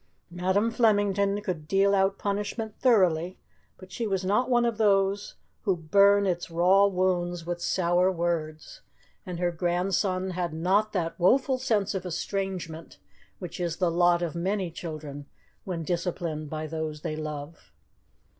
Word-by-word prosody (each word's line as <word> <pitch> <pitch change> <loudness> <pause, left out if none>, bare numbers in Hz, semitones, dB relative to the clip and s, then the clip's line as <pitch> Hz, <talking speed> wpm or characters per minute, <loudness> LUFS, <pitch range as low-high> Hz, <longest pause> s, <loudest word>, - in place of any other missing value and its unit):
Madam 190 +6 +1
Flemington 205 -3 +2
could 170 -7 -4
deal 195 +2 +3
out 195 0 +2
punishment 205 +2 -3
thoroughly, 185 -8 +3 0.4
but 185 -1 -14
she 225 +4 -3
was 190 -2 -1
not 210 +7 +1
one 240 -1 +3
of 230 -2 -1
those 200 -1 +2 0.3
who 195 -4 0
burn 200 +5 +4
its 175 -1 -1
raw 185 +4 +4
wounds 175 -2 -1
with 175 0 -4
sour 180 +1 +2
words, 170 - -3 0.5
and 180 -2 -4
her 175 0 0
grandson 185 +2 0
had 175 -3 -3
not 195 +6 +1
that 165 -3 -2
woeful 260 +8 +3
sense 215 -6 0
of 190 -2 -3
estrangement 180 -2 -4 0.4
which 180 -2 -8
is 175 -2 -2
the 180 -3 +1
lot 175 0 +3
of 170 - -2
many 185 +1 -2
children 155 -4 -7 0.4
when 175 -3 -3
disciplined 170 -3 -3
by 155 0 -4
those 155 -1 -4
they 155 - -3
love. 155 0 -7
180 Hz, 145 wpm, -27 LUFS, 170-200 Hz, 0.5 s, burn